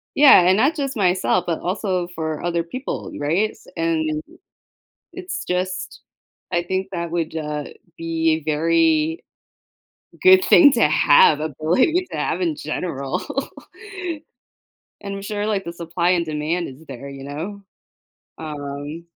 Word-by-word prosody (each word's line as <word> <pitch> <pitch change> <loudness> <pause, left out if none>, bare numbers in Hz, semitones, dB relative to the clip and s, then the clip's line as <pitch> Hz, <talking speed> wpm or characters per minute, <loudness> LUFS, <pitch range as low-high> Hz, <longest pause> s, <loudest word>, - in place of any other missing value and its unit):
Yeah, 280 -9 +8
and 185 +2 +5
not 280 +8 +3
just 275 -3 -3
myself, 185 -2 +2
but 165 -2 -2
also 185 -1 -2
for 160 -2 -3
other 170 -1 0
people, 255 +11 -5
right? 175 +9 +1
S - - -20
and 155 -2 0 0.9
it's 370 0 -5
just, 185 +1 -3 0.5
I 175 -1 +1
think 190 +2 -2
that 170 -2 -4
would, 165 -2 -2
uh, 150 -2 -3 0.3
be 165 -1 0
very 160 0 +2 1.0
good 375 0 +7
thing 290 -4 +7
to 190 - +4
have 150 0 +5
ability 165 - +1
to - - -4
have - - -1
in 335 -4 0
general. 140 - -3 1.8
And 200 -1 -5
I'm 195 - -6
sure, 205 +1 -3
like, 200 -3 0
the 170 - -6
supply 170 +1 -1
and 175 -2 +1
demand 155 +3 -2
is 135 +4 -12
there, 135 +1 -8
you 135 -1 -9
know. 165 +9 -6 0.8
Um 145 +1 -6
170 Hz, 140 wpm, -21 LUFS, 155-195 Hz, 1.8 s, Yeah